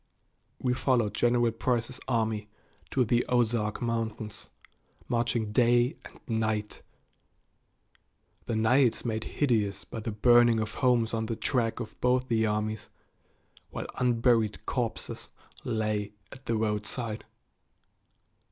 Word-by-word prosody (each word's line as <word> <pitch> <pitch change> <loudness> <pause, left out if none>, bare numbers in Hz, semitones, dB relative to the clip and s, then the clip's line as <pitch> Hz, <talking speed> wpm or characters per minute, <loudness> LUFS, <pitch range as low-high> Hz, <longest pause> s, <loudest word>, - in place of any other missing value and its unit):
We 125 -1 0
followed 125 -4 +1
General 120 -1 +2
Price's 120 +1 -1
army 110 -4 0 0.4
to 130 -2 +2
the 120 +2 +2
Ozark 115 -3 +1
Mountains, 115 -2 -3 0.6
marching 115 -2 0
day 120 +4 +3
and - - -13
night 110 -2 -1 1.7
the 115 - -1
nights 120 +3 +3
made 110 -1 -2
hideous 110 -8 0
by 115 - -6
the 115 - -4
burning 120 +1 +5
of 110 0 -3
homes 120 -3 +2
on 110 -1 -1
the 115 - -2
track 115 0 0
of 115 - -8
both 125 +1 +2
the 110 -1 +2
armies, 105 0 -2 0.8
while - - -5
unburied 120 -3 +2
corpses 120 -4 -3 0.3
lay 105 -2 -1 0.2
at 130 0 -13
the 115 - +1
roadside. 110 +1 -2
115 Hz, 115 wpm, -29 LUFS, 110-120 Hz, 1.7 s, burning